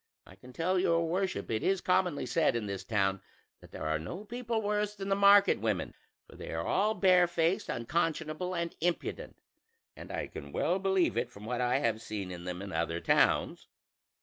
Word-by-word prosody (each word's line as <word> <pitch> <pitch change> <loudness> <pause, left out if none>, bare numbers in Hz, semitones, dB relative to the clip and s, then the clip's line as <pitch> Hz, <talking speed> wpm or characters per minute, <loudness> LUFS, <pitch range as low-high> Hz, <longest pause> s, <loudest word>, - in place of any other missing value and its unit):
I - - -15
can 125 - -14
tell 180 +7 0
your 165 -2 +2
worship 185 -2 -2
it 110 - 0
is 195 0 +1
commonly 180 -4 +1
said 160 -7 +2
in 115 -2 -2
this 100 -1 -4
town 95 -2 0 0.4
that - - -16
there - - -7
are 80 0 0
no 175 - -7
people 235 0 -3
worse 210 0 -1
than 195 -1 -5
the 195 - +3
market 200 0 +6
women, 110 -4 -1 0.3
for - - -15
they - - -8
are 80 0 -2
all 215 +2 +1
barefaced, 175 -2 +3
unconscionable, 160 +6 -2
and 170 0 -3
impudent; 175 +1 -2 0.6
and - - -10
I - - -3
can - - -9
well 185 - +1
believe 190 -2 +1
it - - 0
from 105 -3 -12
what 125 +2 -2
I 125 +1 +2
have 115 -5 0
seen 105 -5 -5
of 90 -1 -8
them 90 +1 -5
in 100 - -7
other 85 +1 -1
towns. - - +2
165 Hz, 195 wpm, -31 LUFS, -, 0.6 s, market